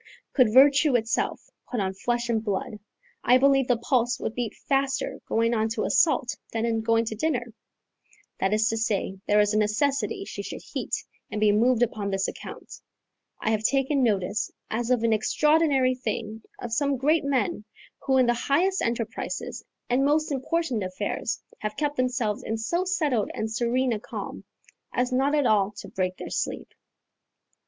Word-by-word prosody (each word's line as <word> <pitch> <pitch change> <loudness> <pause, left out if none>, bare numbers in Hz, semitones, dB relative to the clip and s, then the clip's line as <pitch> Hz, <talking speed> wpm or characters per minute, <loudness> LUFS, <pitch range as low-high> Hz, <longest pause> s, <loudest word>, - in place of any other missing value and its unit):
Could 250 -6 +4
virtue 280 +2 +6
itself 225 -1 -1 0.2
put 245 - -2
on 190 -1 -1
flesh 240 +4 -1
and 225 -2 0
blood, 210 0 -3 0.4
I 250 - +6
believe 270 -1 +4
the 245 - +3
pulse 245 0 +1
would - - -3
beat 240 -3 -3
faster 270 -1 0
going 230 +1 +1
on 220 -1 +1
to 215 - -1
assault 305 -6 +2 0.2
than 225 0 -1
in 225 -1 0
going 230 +1 +2
to 220 - -4
dinner: 245 -3 -1 0.9
that 190 - +1
is 215 +1 +3
to 225 - -1
say, 200 -3 -1
there 210 0 +4
is 210 0 +3
a 215 - +3
necessity 280 - 0
she - - -6
should - - -7
heat - - -4 0.2
and 210 - -3
be 210 -1 +4
moved 235 +3 +3
upon 215 -3 -2
this 195 0 0
account. - - -9 0.6
I 215 - +1
have 215 -1 +1
taken 270 +4 +2
notice, 210 -2 0 0.2
as 235 +2 -1
of 250 -3 +2
an 230 -1 +3
extraordinary 280 +3 +3
thing, 225 -3 -4 0.2
of 235 -2 -5
some 280 +2 +1
great 305 +5 +2
men, 260 -7 0 0.4
who 265 -1 +1
in 255 - +5
the 240 - +3
highest 335 +10 +1
enterprises 230 -1 -3 0.2
and 250 +2 +2
most 300 +2 +2
important 275 -2 -1
affairs 195 +3 -3 0.2
have 215 0 -4
kept 290 0 -1
themselves 245 -5 0
in 220 - -3
so 340 +12 -1
settled 295 - 0
and 220 0 -3
serene 245 +2 +1
a 215 - -2
calm, - - -7 0.5
as 250 +1 0
not 270 +3 +2
at 290 -3 +2
all 205 -4 +3
to 205 - -9
break 185 -1 -2
their - - -7
sleep. - - -3
240 Hz, 175 wpm, -26 LUFS, 215-270 Hz, 0.9 s, virtue